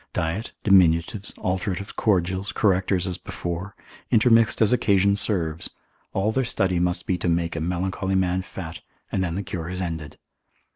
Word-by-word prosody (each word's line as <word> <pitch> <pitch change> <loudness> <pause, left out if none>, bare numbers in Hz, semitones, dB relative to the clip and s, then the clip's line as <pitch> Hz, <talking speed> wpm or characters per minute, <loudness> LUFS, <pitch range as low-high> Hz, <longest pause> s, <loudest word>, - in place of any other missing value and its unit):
Diet, 85 +7 -2
diminutives, 95 0 +3
alteratives, 95 +1 -3
cordials, 95 -1 0
correctors 95 -2 +1
as 90 -2 -3
before, 90 +3 -5 0.3
intermixed 115 -1 +4
as 110 +2 +4
occasion 100 -4 +3
serves, 85 -6 0 0.4
all 100 +3 0
their 130 +4 +1
study 95 -7 0
must 90 +1 0
be 90 -1 -1
to 85 - 0
make 85 0 0
a 80 - -3
melancholy 95 +3 -1
man 95 0 +1
fat, 85 -3 -8 0.3
and 95 - 0
then 85 -2 -2
the 100 - -2
cure 85 -2 -5
is 90 0 -4
ended. 80 -4 -5
95 Hz, 155 wpm, -24 LUFS, 85-100 Hz, 0.4 s, intermixed